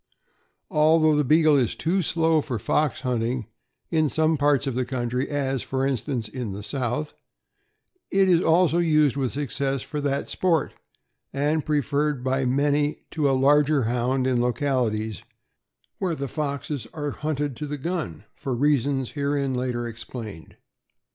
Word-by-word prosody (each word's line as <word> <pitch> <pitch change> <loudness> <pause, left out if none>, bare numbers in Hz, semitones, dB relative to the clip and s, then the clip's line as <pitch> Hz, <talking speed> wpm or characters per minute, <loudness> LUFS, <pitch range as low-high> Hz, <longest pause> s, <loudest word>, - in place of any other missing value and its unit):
Although 155 0 +4
the 150 - +3
Beagle 155 +2 +4
is 125 -4 +1
too 180 +4 0
slow 160 -1 +2
for 130 -5 -3
fox 130 +6 0
hunting, 120 -2 -1 0.5
in 155 -3 +2
some 160 +2 +2
parts 145 -1 +2
of 135 - -1
the 130 +2 0
country, 125 0 -2
as, 135 -3 -1
for 135 0 -1
instance, 130 -3 -2
in 110 -2 -5
the 100 +1 -7
South, 130 +5 -2 1.0
it 195 0 +3
is 175 -2 +4
also 170 0 +3
used 155 -5 +3
with 135 -3 -1
success 135 -1 -2
for 150 -1 -4
that 140 0 -1
sport, 170 -5 0 0.6
and 145 +3 0
preferred 145 -2 0
by 130 0 0
many 145 +3 +1
to 150 -3 +1
a 135 - +2
larger 145 +1 +4
Hound 125 +3 0
in 125 -2 +2
localities 120 - 0 0.8
where 180 -4 -1
the 140 -2 -4
foxes 140 -3 -3
are 145 -2 -2
hunted 145 -3 -2
to 150 - -4
the 145 +1 -4
gun, 150 - -4
for 130 -3 -4
reasons 135 -1 +1
herein 140 -2 -1
later 125 -1 -2
explained. 110 -6 -8
140 Hz, 150 wpm, -25 LUFS, 125-150 Hz, 1.0 s, Although